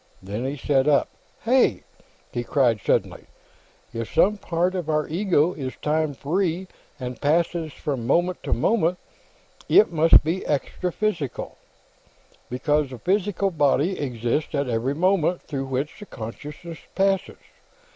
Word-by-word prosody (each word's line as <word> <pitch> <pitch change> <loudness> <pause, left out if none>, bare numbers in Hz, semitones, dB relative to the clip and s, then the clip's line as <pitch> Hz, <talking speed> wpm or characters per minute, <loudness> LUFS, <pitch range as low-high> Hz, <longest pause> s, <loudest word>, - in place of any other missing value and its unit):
Then 105 +6 -4
he 140 +2 -3
sat 135 0 +1
up. 145 -2 +3 0.3
"Hey!" 250 +3 +3 0.5
he 120 - -2
cried, 120 -3 +2
suddenly. - - 0 0.7
"If 115 -1 -4
some 210 +3 +3
part 175 +1 0
of 175 -4 -3
our 155 -1 +1
ego 175 -1 +2
is 130 -4 -5
time 155 -1 0
free 175 +5 -1 0.3
and 125 -1 -6
passes 160 +1 +1
from 135 -5 -4
moment 175 +6 +1
to - - -5
moment, 180 -6 +2 0.7
it 215 - +6
must 165 0 +6
be 165 +5 -1
extraphysical, 170 - -2 1.0
because 145 +3 0
the 130 - -8
physical 195 - 0
body 150 +3 +2
exists 125 +3 -2
at 140 -1 0
every 120 +4 -1
moment 180 0 +2
through 135 -3 -4
which 135 +3 -3
the 205 - -10
consciousness 150 +9 -8 0.2
passes. 195 -1 +1
155 Hz, 135 wpm, -24 LUFS, 135-180 Hz, 1.0 s, it